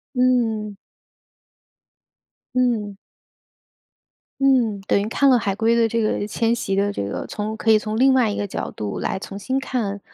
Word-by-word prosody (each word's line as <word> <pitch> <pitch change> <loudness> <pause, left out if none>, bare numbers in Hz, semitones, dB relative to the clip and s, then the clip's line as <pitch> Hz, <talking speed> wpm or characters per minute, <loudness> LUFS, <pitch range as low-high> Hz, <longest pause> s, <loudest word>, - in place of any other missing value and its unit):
嗯。 230 -5 +1 1.8
嗯。 225 -6 0 1.4
嗯。 245 -7 +3
等 - - +2
于 205 - -2
看 275 +4 +2
了 255 -2 +6
海 200 -3 -1
龟 230 +2 +2
的 230 -1 +3
这 230 +1 -1
个 215 -1 0
迁 230 +2 0
徙 195 -4 -2
的 205 +1 +1
这 - - -3
个 100 0 -4
从 215 +1 -4
可 225 - 0
以 215 - +6
从 215 +1 -4
另 265 +1 +5
外 245 -5 +3
一 - - -3
个 205 - -2
角 - - -5
度 105 -2 -5
来 - - -2
重 195 +1 -8
新 260 +6 -1
看， 220 -7 -3
220 Hz, 185 characters per minute, -22 LUFS, 205-245 Hz, 1.8 s, 了